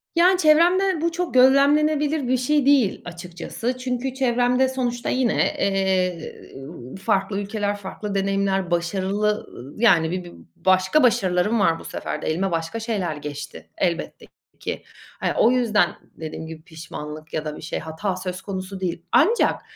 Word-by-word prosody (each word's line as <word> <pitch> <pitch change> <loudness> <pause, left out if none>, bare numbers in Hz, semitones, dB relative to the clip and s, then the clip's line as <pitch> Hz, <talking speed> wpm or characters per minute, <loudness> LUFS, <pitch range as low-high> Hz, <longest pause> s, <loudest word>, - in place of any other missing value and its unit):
Yani 360 +2 +5
çevremde 345 +3 +4
bu 335 +1 +1
çok 350 +1 -3
gözlemlenebilir 285 +2 +4
bir 255 +1 +2
şey 285 +3 +1
değil 270 -8 +3
açıkçası. 175 +8 -5
Çünkü 255 0 -3
çevremde 250 0 +2
sonuçta 245 -2 -2
yine, 255 -3 +1
eee, 190 -3 -1
ııı, 135 -2 -10
farklı 195 +1 0
ülkeler, 205 0 -2
farklı 200 +1 -6
deneyimler, 195 -1 0
başarılı 190 +4 0 0.3
ı 130 +4 -10
yani 170 -8 +4
bi 185 0 -3
bir 175 - -11 0.2
başka 185 - +3
başarılarım 205 -1 +2
var 165 -4 +2
bu - - -12
sefer - - -5
de. - - -4
Elime 185 +4 0
başka 165 +7 -2
şeyler 205 -8 -2
geçti 145 0 -8
elbette 170 -2 -2 0.3
ki. - - -5 0.4
Hani - - 0
o 235 - +5
yüzden 225 -7 +2 0.2
dediğim 160 0 -7
gibi 160 -1 -9
pişmanlık 155 -2 -9
ya 155 0 -2
da 150 0 -5
bir - - -10
şey, 155 - -4
hata 160 +5 -3
söz 185 0 -5
konusu 190 -1 -6
değil. 175 -2 -3
Ancak, 465 +3 +3
195 Hz, 155 wpm, -23 LUFS, 175-255 Hz, 0.4 s, Yani